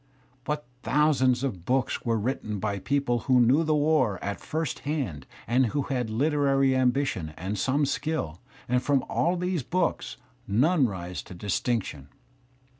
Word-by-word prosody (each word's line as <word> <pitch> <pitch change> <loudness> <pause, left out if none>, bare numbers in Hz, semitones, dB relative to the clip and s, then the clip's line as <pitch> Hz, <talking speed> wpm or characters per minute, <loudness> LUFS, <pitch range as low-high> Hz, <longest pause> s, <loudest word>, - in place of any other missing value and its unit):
But 150 -1 -2 0.2
thousands 130 -1 +2
of 100 -11 -3
books 130 +5 0
were 115 -1 +1
written 110 -2 -2
by 100 0 -2
people 135 -1 0
who 130 -1 +6
knew 130 +7 +4
the 155 -1 +2
war 145 - +2
at 100 0 -3
first 160 -3 -3
hand 130 - -3 0.2
and 125 +3 +3
who 140 +5 -1
had 125 -4 -2
literary 135 +1 +2
ambition 125 - 0
and 95 +4 -3
some 135 +8 +1
skill, 140 - -2 0.3
and 125 +1 +2
from 135 0 +1
all 175 +2 +1
these 180 -2 -1
books 175 +6 -1 0.3
none 135 - +3
rises 90 -3 -5
to 90 - -10
distinction. 100 - -2
130 Hz, 150 wpm, -27 LUFS, 105-145 Hz, 0.3 s, who